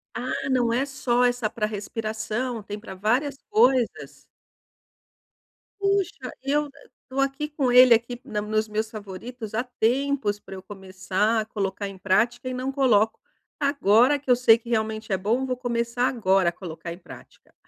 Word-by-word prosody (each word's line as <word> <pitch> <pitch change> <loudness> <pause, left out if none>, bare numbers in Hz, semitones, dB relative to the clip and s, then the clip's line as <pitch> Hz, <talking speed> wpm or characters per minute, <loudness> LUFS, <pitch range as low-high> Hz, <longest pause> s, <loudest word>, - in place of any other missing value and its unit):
Ah, 260 +2 -3
não 240 -3 +2
é 260 +3 +1
só 250 -3 0
essa 245 -3 +1
pra 215 - -2
respiração? 220 +2 -4
Tem 205 +1 -6
pra 205 -3 -9
várias 250 +9 0
coisas? 265 - +2 1.6
Puxa! 395 -10 0
Eu 290 +2 0 0.4
tô 265 +1 -4
aqui 275 +2 -1
com 280 -4 -1
ele 250 0 +8
aqui 235 +1 0
na 210 -1 -3
nos 215 +1 -1
meus 215 +1 -2
favoritos 215 +2 -8
há 220 +3 0
tempos 250 -2 0
pra 195 - -10
eu 190 - -8
começar 190 +2 -1
a - - -5
colocar 200 -2 -3
em 195 -1 -9
prática 235 +7 +1
e - - -4
não 255 +1 -3
coloco. 230 -6 +2 0.4
Agora 280 -1 +4
que 275 - -13
eu 250 - +7
sei 235 -2 +6
que 235 0 -13
realmente 220 -2 -1
é - - +2
bom, 225 +8 0
vou 255 -1 -1
começar 240 0 -1
agora 195 -8 +2
a - - -5
colocar 170 -1 -8
em 170 - -7
prática. 185 - -15
235 Hz, 165 wpm, -25 LUFS, 210-255 Hz, 1.6 s, ele